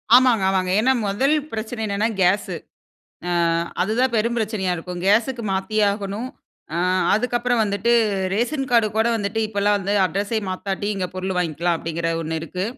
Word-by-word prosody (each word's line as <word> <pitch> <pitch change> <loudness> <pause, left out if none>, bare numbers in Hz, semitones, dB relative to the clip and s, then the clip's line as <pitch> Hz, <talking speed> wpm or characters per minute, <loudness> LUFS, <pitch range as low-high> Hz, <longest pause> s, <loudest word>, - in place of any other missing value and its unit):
ஆமாங்க, 245 -5 +5
ஆமாங்க. 185 -1 0
ஏன்னா, 260 +4 +3
முதல் 265 +10 +2 0.2
பிரச்சனை 220 +1 -4
என்னென்னா, 205 +2 0
கேஸு. 185 +3 +2 0.7
அ - - -1 0.5
அதுதான் 235 +6 +1
பெரும் 235 +2 +1
பிரச்சனையா 205 -5 -1
இருக்கும். 175 +1 -6
கேஸுக்கு 230 +4 +2
மாத்தியாகணும். 200 +2 -1 0.5
அ - - 0 0.4
அதுக்கப்புறம் 240 +1 +1
வந்துட்டு 205 +3 0 0.4
ரேஷன் 265 +5 -1
கார்டு 230 -3 +4
கூட 220 +1 +3
வந்துட்டு 205 +2 -2
இப்போலாம் 205 -1 +1
வந்து 200 +1 -2
அட்ரஸை 205 +4 -1
மாத்தட்டி 195 +2 -3
இங்க 185 -2 -1
பொருள் 185 0 -3
வாங்கிக்கலாம் 170 0 0
அப்டீங்குற 165 +1 -3
ஒண்ணு 160 0 -3
இருக்கு. 180 +3 -4
205 Hz, 145 wpm, -22 LUFS, 190-230 Hz, 0.7 s, ஆமாங்க